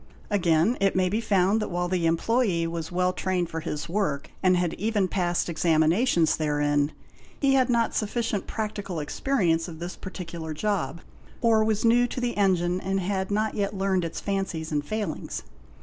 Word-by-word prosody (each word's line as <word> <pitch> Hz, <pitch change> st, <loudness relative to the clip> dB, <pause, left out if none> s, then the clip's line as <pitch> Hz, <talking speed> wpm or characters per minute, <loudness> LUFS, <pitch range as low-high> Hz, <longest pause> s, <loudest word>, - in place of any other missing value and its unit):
Again 175 Hz, +3 st, +3 dB
it 195 Hz, -1 st, +2 dB
may 185 Hz, -1 st, +2 dB
be 215 Hz, +4 st, 0 dB
found 200 Hz, 0 st, +2 dB
that -, -, -2 dB
while 175 Hz, 0 st, -1 dB
the 175 Hz, -2 st, +1 dB
employé 175 Hz, +1 st, +1 dB
was 165 Hz, 0 st, -4 dB
well 180 Hz, +1 st, +1 dB
trained 185 Hz, -2 st, -1 dB
for 165 Hz, -, -3 dB
his 150 Hz, -1 st, -4 dB
work 170 Hz, -6 st, -1 dB
and 185 Hz, -1 st, +4 dB
had 175 Hz, -2 st, 0 dB
even 210 Hz, -1 st, 0 dB
passed 175 Hz, -2 st, 0 dB
examinations 165 Hz, +3 st, +2 dB
therein, 145 Hz, -1 st, +1 dB, 0.5 s
he 275 Hz, -1 st, +3 dB
had 260 Hz, -2 st, +3 dB
not 235 Hz, -2 st, +2 dB
sufficient 215 Hz, -2 st, -1 dB
practical 205 Hz, -5 st, -4 dB
experience 165 Hz, -, 0 dB
of 165 Hz, -2 st, -8 dB
this 175 Hz, +2 st, -6 dB
particular 165 Hz, -4 st, -6 dB
job, 170 Hz, -4 st, -1 dB, 0.4 s
or 225 Hz, -2 st, +4 dB
was 215 Hz, 0 st, 0 dB
new 240 Hz, +2 st, +5 dB
to 245 Hz, -, -5 dB
the 245 Hz, -1 st, -1 dB
engine 185 Hz, -2 st, +2 dB
and 195 Hz, +1 st, -1 dB
had 190 Hz, 0 st, -1 dB
not 215 Hz, +1 st, 0 dB
get 200 Hz, 0 st, -1 dB
learned 190 Hz, -2 st, +1 dB
its 165 Hz, -, -4 dB
fancies 190 Hz, -6 st, -3 dB
and 145 Hz, -1 st, 0 dB
failings. 215 Hz, +5 st, -4 dB
185 Hz, 175 wpm, -26 LUFS, 165-210 Hz, 0.5 s, new